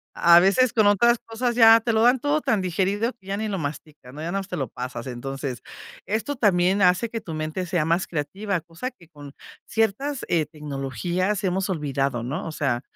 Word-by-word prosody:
a 170 Hz, 0 st, +6 dB
a -, -, +10 dB
veces 205 Hz, +7 st, +3 dB
con 215 Hz, -3 st, +4 dB
otras 235 Hz, +4 st, +4 dB
cosas 235 Hz, +1 st, -2 dB
ya 225 Hz, -1 st, +8 dB
te 230 Hz, 0 st, -1 dB
lo 220 Hz, -, +2 dB
dan 245 Hz, +2 st, +4 dB
todo 290 Hz, +3 st, 0 dB
tan 220 Hz, -7 st, +1 dB
digerido 195 Hz, +6 st, -1 dB
que 195 Hz, -5 st, -23 dB
ya 200 Hz, +1 st, -2 dB
ni 220 Hz, 0 st, -2 dB
lo 195 Hz, -3 st, -3 dB
mastican, 145 Hz, -3 st, -7 dB
¿no? 150 Hz, -, -7 dB
Ya -, -, -4 dB
nada 195 Hz, -, -1 dB
más 195 Hz, -, -7 dB
te -, -, -5 dB
lo 135 Hz, -, -2 dB
pasas. 125 Hz, 0 st, -6 dB
Entonces, 135 Hz, +1 st, -5 dB, 0.5 s
esto 225 Hz, +7 st, -2 dB
también 195 Hz, -3 st, +2 dB
hace 185 Hz, +5 st, +3 dB
que 230 Hz, -1 st, -5 dB
tu 160 Hz, -2 st, -7 dB
mente 155 Hz, +4 st, -3 dB
sea 170 Hz, -4 st, 0 dB
más 170 Hz, +3 st, +1 dB
creativa, 190 Hz, +5 st, -3 dB
cosa 170 Hz, +10 st, -6 dB
que, 175 Hz, -11 st, -21 dB
con 145 Hz, -3 st, -12 dB, 0.3 s
ciertas, 225 Hz, +6 st, -1 dB
eh, 160 Hz, -3 st, +1 dB
tecnologías 155 Hz, -, -3 dB
hemos 190 Hz, +1 st, -1 dB
olvidado, 140 Hz, -7 st, -1 dB
¿no?, 145 Hz, +9 st, -4 dB
o -, -, -4 dB
sea, 135 Hz, -6 st, -1 dB
185 Hz, 215 wpm, -24 LUFS, 150-220 Hz, 0.5 s, a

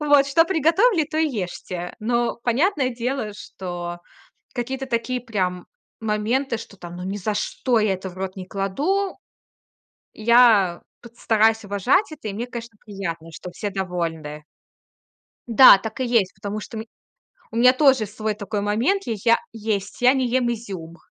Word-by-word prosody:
Вот, 290 Hz, -2 st, +4 dB
что 330 Hz, +4 st, +4 dB
приготовили, 340 Hz, -, +3 dB
то 310 Hz, +1 st, -6 dB
и 320 Hz, 0 st, +3 dB
ешьте. 180 Hz, -5 st, -5 dB
Но, 235 Hz, +2 st, 0 dB
понятное 270 Hz, -, +1 dB
дело, 245 Hz, -2 st, -3 dB
что 175 Hz, -3 st, -6 dB, 0.6 s
какие-то 265 Hz, +2 st, -3 dB
такие 250 Hz, +1 st, -1 dB
прям 185 Hz, -7 st, -2 dB, 0.3 s
моменты, 225 Hz, +4 st, 0 dB
что 220 Hz, -3 st, -11 dB
там: 175 Hz, -1 st, -9 dB
ну 180 Hz, -, -6 dB
ни 195 Hz, +2 st, -3 dB
за 205 Hz, +1 st, -2 dB
что 240 Hz, +3 st, 0 dB
я 210 Hz, -2 st, +2 dB
это 190 Hz, 0 st, -6 dB
в -, -, -14 dB
рот 190 Hz, 0 st, -4 dB
не 185 Hz, -1 st, -7 dB
кладу. 290 Hz, -, -1 dB, 1.0 s
Я 220 Hz, -6 st, +4 dB, 0.2 s
пыт 235 Hz, 0 st, -15 dB
стараюсь 220 Hz, 0 st, +3 dB
уважать 205 Hz, -, +1 dB
это. 285 Hz, -8 st, -7 dB
И -, -, -3 dB
мне, 225 Hz, +5 st, -4 dB
конечно, 235 Hz, -2 st, -8 dB
приятно, 175 Hz, -6 st, -5 dB
что 180 Hz, +3 st, -8 dB
все 205 Hz, +3 st, -4 dB
довольны. 165 Hz, -6 st, -4 dB, 1.0 s
Да, 235 Hz, -2 st, +9 dB
так 220 Hz, +4 st, -7 dB
и 260 Hz, -, 0 dB
есть, 230 Hz, -6 st, +2 dB
потому 200 Hz, +2 st, -5 dB
что 220 Hz, +2 st, -8 dB
у -, -, -3 dB
ми 225 Hz, -, -11 dB, 0.7 s
у -, -, -3 dB
меня 250 Hz, +2 st, +6 dB
тоже 265 Hz, -4 st, +4 dB
свой 215 Hz, +1 st, -3 dB
такой 205 Hz, 0 st, -4 dB
момент. 235 Hz, -, +1 dB
Я 230 Hz, -, -1 dB
я 230 Hz, +3 st, +3 dB, 0.2 s
есть, 210 Hz, -2 st, -3 dB
я 250 Hz, +2 st, +6 dB
не 260 Hz, -2 st, +1 dB
ем 245 Hz, -1 st, +1 dB
изюм. 190 Hz, -8 st, -7 dB
220 Hz, 170 wpm, -23 LUFS, 195-255 Hz, 1.0 s, Да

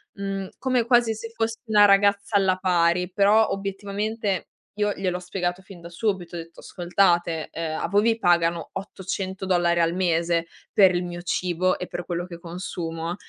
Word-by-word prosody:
mhmm, 195 Hz, -1 st, -4 dB
come 255 Hz, -2 st, +1 dB
quasi 240 Hz, -2 st, +4 dB
se 225 Hz, +1 st, -7 dB
fossi 225 Hz, 0 st, -2 dB
una 210 Hz, -1 st, +6 dB
ragazza 200 Hz, +1 st, +3 dB
alla 190 Hz, -2 st, +3 dB
pari. 180 Hz, -1 st, +2 dB
Però 205 Hz, +3 st, +4 dB
obiettivamente 200 Hz, 0 st, -3 dB, 0.3 s
io 210 Hz, 0 st, +2 dB
gliel'ho 185 Hz, -2 st, -2 dB
spiegato 180 Hz, 0 st, -3 dB
fin 190 Hz, -1 st, -13 dB
da 170 Hz, -, -10 dB
subito, 175 Hz, -1 st, -2 dB
ho -, -, -4 dB
detto: 165 Hz, 0 st, -11 dB
"Ascoltate, 175 Hz, -2 st, +1 dB
ehm, 160 Hz, -1 st, -4 dB
a -, -, -2 dB
voi 205 Hz, +1 st, +3 dB
vi 225 Hz, +1 st, +2 dB
pagano 170 Hz, -3 st, +2 dB
800$ 185 Hz, -2 st, -1 dB
al 165 Hz, 0 st, +2 dB
mese 170 Hz, -2 st, +1 dB, 0.3 s
per 190 Hz, -3 st, +6 dB
il 175 Hz, 0 st, 0 dB
mio 175 Hz, 0 st, -6 dB
cibo 180 Hz, +1 st, 0 dB
e 180 Hz, -, -4 dB
per 175 Hz, -, -5 dB
quello 175 Hz, 0 st, -3 dB
che 175 Hz, -2 st, -9 dB
consumo 170 Hz, -1 st, -5 dB
185 Hz, 165 wpm, -24 LUFS, 175-200 Hz, 0.3 s, una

